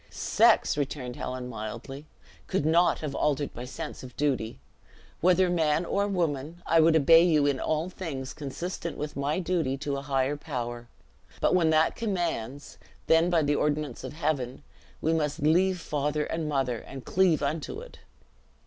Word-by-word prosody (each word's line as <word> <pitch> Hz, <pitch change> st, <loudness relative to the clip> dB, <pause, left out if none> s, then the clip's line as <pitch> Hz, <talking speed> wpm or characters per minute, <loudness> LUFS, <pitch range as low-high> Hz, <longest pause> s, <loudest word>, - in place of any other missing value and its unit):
"Sex," -, -, +3 dB
returned 130 Hz, -3 st, -3 dB
Helen, 125 Hz, -1 st, -5 dB
mildly, 120 Hz, +6 st, -7 dB, 0.4 s
"could 190 Hz, -6 st, 0 dB
not 170 Hz, +3 st, +3 dB
have 150 Hz, -3 st, -4 dB
altered 145 Hz, 0 st, 0 dB
my 120 Hz, -, -6 dB
sense 125 Hz, -, -7 dB
of 125 Hz, -2 st, -11 dB
duty. 130 Hz, -6 st, -1 dB, 0.6 s
Whether 185 Hz, +1 st, +4 dB
man 165 Hz, -1 st, +1 dB
or 200 Hz, +3 st, 0 dB
woman, 170 Hz, -3 st, -2 dB
I 165 Hz, -, +4 dB
would 160 Hz, 0 st, +5 dB
obey 165 Hz, +2 st, +7 dB
you 155 Hz, -5 st, +3 dB
in 140 Hz, -2 st, +1 dB
all 155 Hz, +2 st, -1 dB
things 140 Hz, -8 st, -5 dB
consistent 165 Hz, +4 st, -5 dB
with 150 Hz, 0 st, -5 dB
my 140 Hz, +2 st, -1 dB
duty 165 Hz, -7 st, 0 dB
to 140 Hz, 0 st, -3 dB
a -, -, -4 dB
higher 135 Hz, +1 st, 0 dB
power; 120 Hz, -3 st, -5 dB, 0.5 s
but -, -, +2 dB
when 170 Hz, -3 st, +4 dB
that 155 Hz, 0 st, +3 dB
commands, 170 Hz, -, -3 dB, 0.3 s
then 165 Hz, +2 st, +4 dB
by 170 Hz, -3 st, +3 dB
the 145 Hz, 0 st, +2 dB
ordinance 145 Hz, -3 st, -1 dB
of -, -, -6 dB
Heaven, 145 Hz, -5 st, -2 dB, 0.4 s
we 160 Hz, -, +1 dB
must 150 Hz, -1 st, -1 dB
'leave 180 Hz, +4 st, +3 dB
father 150 Hz, -1 st, -1 dB
and 160 Hz, -2 st, -3 dB
mother, 130 Hz, -5 st, 0 dB
and 135 Hz, +3 st, -10 dB
cleave 175 Hz, -5 st, +2 dB
unto 155 Hz, -, -2 dB
it.'" -, -, -12 dB
150 Hz, 165 wpm, -28 LUFS, 135-165 Hz, 0.6 s, obey